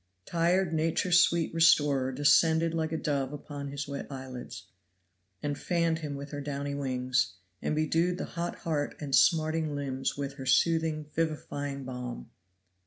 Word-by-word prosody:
Tired 175 +1 +1
nature's 165 +3 +3
sweet 170 -2 +2
restorer 145 -5 +4
descended 160 +4 +4
like 160 -1 -1
a 160 - -1
dove 140 -3 -1
upon 145 -1 -6
his 140 +1 -5
wet 140 0 -5
eyelids, 130 -6 -7 0.8
and 145 -1 -1
fanned 170 0 0
him 150 -3 -4
with 140 +1 -7
her 145 -1 -4
downy 140 0 -3
wings, 130 -5 0 0.3
and - - -1
bedewed 165 +3 +1
the - - -3
hot 170 0 -4
heart 150 -3 -2
and 145 -3 -5
smarting 155 -1 +3
limbs 135 -2 -2
with 140 -1 -3
her 135 - -6
soothing, 160 +1 +2
vivifying 145 -3 -2
balm. 125 - -6
145 Hz, 150 wpm, -29 LUFS, 140-165 Hz, 0.8 s, restorer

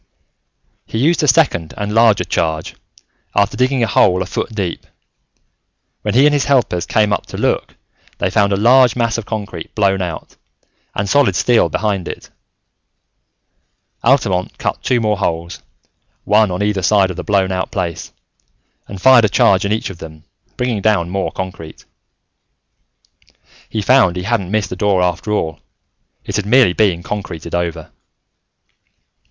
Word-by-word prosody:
He - - -5
used 160 +9 +2
a 150 - +1
second 90 - +2
and 105 0 -3
larger 115 -2 +4
charge, 80 -2 -2 0.6
after 100 -1 +1
digging 130 -1 +1
a - - +1
hole 95 -2 +3
a - - -9
foot - - -4
deep. 100 -6 -4 1.1
When - - -2
he 135 +3 +5
and 150 - +4
his 145 -2 +1
helpers 120 -11 +1
came 105 -1 +2
up - - -3
to - - -8
look, - - -1 0.4
they - - -1
found 100 -1 +2
a - - +2
large 125 +2 +4
mass 115 -1 0
of 110 - -9
concrete 100 -7 -6
blown 95 -2 +1
out, 85 -3 -6 0.6
and 100 - -2
solid 135 -5 +2
steel 120 +7 +2
behind 100 -5 -2
it. - - -8 1.7
Altamont 90 -1 +1
cut - - -3
two 125 -2 +1
more 105 -3 0
holes, 85 -1 -3 0.6
one 105 0 +3
on 90 +3 -2
either 105 -2 0
side 95 0 +3
of - - -7
the - - -6
blown 95 -2 +1
out 95 0 -2
place, 90 -7 -4 0.8
and 100 - -8
fired 125 +1 +6
a - - +1
charge 95 -1 +3
in 100 - -1
each 110 -2 -2
of 85 - -12
them, 80 -1 -11 0.3
bringing 120 -4 -1
down 95 -5 +1
more 95 0 -2
concrete. 90 -4 -8 1.8
He 110 -2 -3
found 120 -7 +4
he 90 - -4
hadn't 100 -3 -1
missed 105 -2 -1
the - - -3
door 95 -1 +1
after 90 +4 -2
all. 80 -7 -2 0.7
It - - -3
had 105 -1 -3
merely 120 -5 +4
been 90 -4 +1
concreted 95 -5 -6
over. 85 -2 -3
100 Hz, 160 wpm, -17 LUFS, 90-115 Hz, 1.8 s, fired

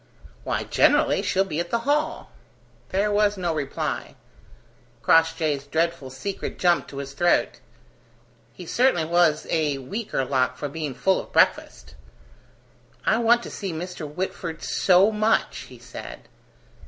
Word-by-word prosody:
"Why, - - -2
generally - - +3
she'll 190 0 +1
be 165 -5 -4
at 170 0 -3
the 235 - 0
Hall." 300 +3 -1 0.6
There 200 +2 0
was 205 0 +2
no 175 -3 -1
reply: 145 -3 -4 0.9
Crossjay's 160 -3 +2
dreadful 165 -2 -1
secret 190 +10 -5
jumped 175 -1 +2
to 140 - -9
his 140 0 -6
throat. 175 +5 +1 0.9
He 175 - -11
certainly 240 -4 +2
was 170 -2 +2
a 150 -4 +1
weaker 135 - -3
lock 130 -1 0
for 145 - -4
being 150 -2 -5
full 190 +7 +2
of - - -9
breakfast. - - +1 1.1
"I 220 - +3
want 235 +1 +4
to - - -8
see 195 -3 -5
Mr. 165 -2 -6
Whitford 165 -1 -5
so 190 +3 +4
much," 215 +1 0
he - - -12
said. - - -10
170 Hz, 140 wpm, -24 LUFS, 150-200 Hz, 1.1 s, want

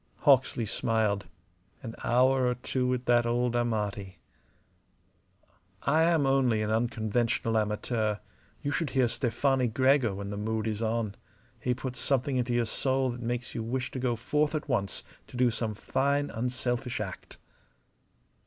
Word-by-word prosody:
Hawksley 130 -5 +4
smiled. 110 -2 0 0.6
An 115 -2 -6
hour 130 +1 +3
or 125 - +1
two 125 +1 -2
with 125 0 -1
that 120 -1 +3
old 120 0 +1
Amati. 105 -5 -2 1.7
"I 155 +3 +3
am 165 -3 +3
only 130 -5 +2
an 105 - -1
unconventional 115 0 0
amateur. 110 0 0 0.5
You 145 - -1
should 150 0 -1
hear 130 -3 +2
Stefani 125 +2 +1
Gregor 130 -1 +3
when 100 0 -5
the 100 - -4
mood 110 +1 -2
is 110 -1 -2
on. 110 -2 -1 0.5
He 125 -1 0
puts 130 0 -5
something 135 0 0
into 125 -1 0
your 120 -1 +2
soul 130 +2 0
that 120 0 -7
makes 120 +1 -3
you 115 - -3
wish 125 +3 -3
to 130 - -4
go 125 -2 0
forth 150 +6 0
at 155 - -3
once 100 -3 -1 0.2
to - - -9
do 125 -1 +4
some 115 -2 -3
fine, 140 +6 0
unselfish 125 +1 -2
act." 100 -3 -7
120 Hz, 155 wpm, -29 LUFS, 110-130 Hz, 1.7 s, Hawksley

